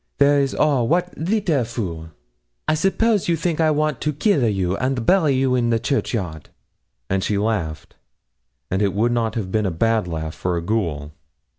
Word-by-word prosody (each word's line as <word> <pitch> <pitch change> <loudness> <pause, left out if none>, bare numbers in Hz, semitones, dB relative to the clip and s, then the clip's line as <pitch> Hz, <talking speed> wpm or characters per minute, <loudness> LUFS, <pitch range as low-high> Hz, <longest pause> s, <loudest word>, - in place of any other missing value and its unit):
There 145 0 +4
is 135 -1 0
all! 140 -6 +2
Wat 180 +4 +1
leetle 170 - 0
fool! 90 -9 -5 0.6
I - - +3
suppose 195 +5 +1
you 170 - +2
think 165 0 -1
I 160 - +4
want 150 -3 0
to 150 - 0
keel 150 - +1
a - - +3
you 95 -2 0
and 130 -2 -1
bury 160 -6 +4
you 130 0 +1
in 120 -2 +1
the 115 - +2
churchyard?' 100 - -2 0.6
And 95 0 0
she 105 - 0
laughed, 100 -7 -2 0.7
and 95 +2 0
it 100 -2 +1
would 115 +4 +2
not 115 -2 0
have 100 -5 -3
been 105 -1 +1
a - - +1
bad 110 +4 +1
laugh 80 -2 -4
for 90 -1 -2
a - - -2
ghoul. 85 -8 -2
115 Hz, 190 wpm, -21 LUFS, 95-150 Hz, 0.7 s, There